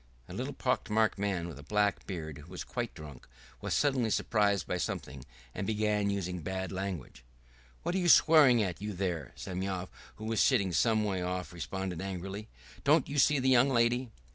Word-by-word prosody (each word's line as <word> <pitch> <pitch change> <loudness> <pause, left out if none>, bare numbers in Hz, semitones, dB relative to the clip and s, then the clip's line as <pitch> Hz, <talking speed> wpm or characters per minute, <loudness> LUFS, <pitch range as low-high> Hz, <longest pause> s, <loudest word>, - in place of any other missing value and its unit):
A - - -9
little - - -4
pock - - -1
marked 110 -1 +2
man 95 -4 -1
with 80 -4 -9
a - - -10
black 105 +6 0
beard, 80 -6 -5
who 75 +3 -13
was 90 -1 -6
quite 120 -2 -4
drunk, 75 -5 -11 0.3
was - - -1
suddenly 135 -6 +2
surprised 105 -3 +1
by 90 - -2
something 65 -6 -4 0.3
and 95 - -4
began 105 -1 +1
using 90 -3 -2
bad 95 +3 -4
language. 95 -10 -5 0.6
"What - - -1
are 190 - +1
you 175 -1 +2
swearing 145 -9 +7
at, 90 -2 -4
you 105 0 -3
there?" 85 -7 -3
Semyon, 95 0 -4 0.3
who 110 - -8
was 110 0 +1
sitting 100 -9 +3
some 110 +3 +3
way 95 -3 -1
off, 90 0 -3
responded 90 +1 -4
angrily. 95 +2 -5 0.4
"Don't 150 +1 +4
you 145 0 0
see 145 +2 +5
the 130 0 +2
young 130 +1 +5
lady?" 120 0 +2
100 Hz, 190 wpm, -31 LUFS, 90-115 Hz, 0.6 s, swearing